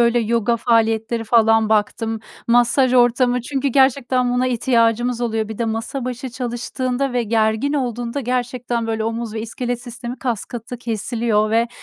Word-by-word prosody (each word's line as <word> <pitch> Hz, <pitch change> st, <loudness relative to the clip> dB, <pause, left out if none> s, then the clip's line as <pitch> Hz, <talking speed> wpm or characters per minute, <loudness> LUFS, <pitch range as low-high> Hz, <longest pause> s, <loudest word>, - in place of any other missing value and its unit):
böyle, 235 Hz, 0 st, +4 dB
yoga 230 Hz, +1 st, +1 dB
faaliyetleri 225 Hz, 0 st, +1 dB
falan 225 Hz, -1 st, +4 dB
baktım, 220 Hz, +1 st, 0 dB, 0.3 s
masaj 245 Hz, +2 st, +3 dB
ortamı... 245 Hz, 0 st, +3 dB
Çünkü 275 Hz, +3 st, -2 dB
gerçekten 255 Hz, -1 st, +2 dB
buna 255 Hz, +1 st, +1 dB
ihtiyacımız 240 Hz, 0 st, +1 dB
oluyor. 220 Hz, -2 st, -1 dB
Bir 220 Hz, -, -7 dB
de 235 Hz, -, 0 dB
masa 230 Hz, +4 st, -3 dB
başı 255 Hz, +1 st, -4 dB
çalıştığında 250 Hz, +2 st, -3 dB
ve 245 Hz, -1 st, +1 dB
gergin 220 Hz, +5 st, +1 dB
olduğunda 245 Hz, -1 st, -2 dB
gerçekten 245 Hz, -1 st, -2 dB
böyle 220 Hz, -1 st, -2 dB
omuz 225 Hz, -1 st, -3 dB
ve 220 Hz, -, -3 dB
iskelet 240 Hz, +2 st, -4 dB
sistemi 245 Hz, 0 st, -7 dB
kaskatı 240 Hz, 0 st, -4 dB
kesiliyor 225 Hz, -1 st, -1 dB
ve 230 Hz, +1 st, +2 dB
235 Hz, 145 wpm, -20 LUFS, 225-250 Hz, 0.3 s, böyle